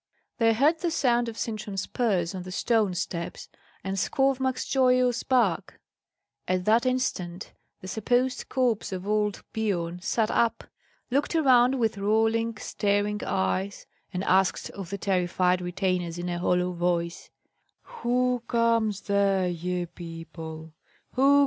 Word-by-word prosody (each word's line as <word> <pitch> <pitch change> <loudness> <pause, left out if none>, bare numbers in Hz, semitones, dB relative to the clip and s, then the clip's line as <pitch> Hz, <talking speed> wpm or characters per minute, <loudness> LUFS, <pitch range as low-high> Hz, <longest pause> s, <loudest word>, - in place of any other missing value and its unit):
They 225 -1 +4
heard 295 +8 +3
the 345 - 0
sound 240 -6 +2
of 225 - -9
Sintram's 215 -3 -3
spurs 195 -7 0
on 185 - -5
the 185 +1 -8
stone 210 -1 +1
steps, 170 -1 -4 0.3
and 195 0 -3
Skovmark's 265 +4 +1
joyous 255 -2 +3
bark. 235 -10 +1 0.7
At 185 0 0
that 230 +4 +4
instant 190 -9 -2 0.3
the 185 - -8
supposed 245 +6 0
corpse 245 -6 0
of 185 +1 -5
old 210 -1 0
Biorn 180 -5 -2
sat 215 +3 0
up, 235 -1 +1 0.5
looked 285 +5 +1
around 260 -4 +5
with 225 -4 0
rolling, 225 +2 +1
staring 205 0 0
eyes, 185 - -1 0.3
and 185 -1 -3
asked 190 0 +2
of 195 -4 -8
the 200 - -3
terrified 180 -1 +1
retainers 180 -1 -1
in 175 +1 -3
a 175 0 -2
hollow 180 0 +1
voice, 170 -1 -1 0.7
"Who 250 0 +1
comes 230 -3 +2
there, 200 -2 +2
ye 180 +1 -2
people? 165 -2 -9
200 Hz, 130 wpm, -27 LUFS, 180-235 Hz, 0.7 s, around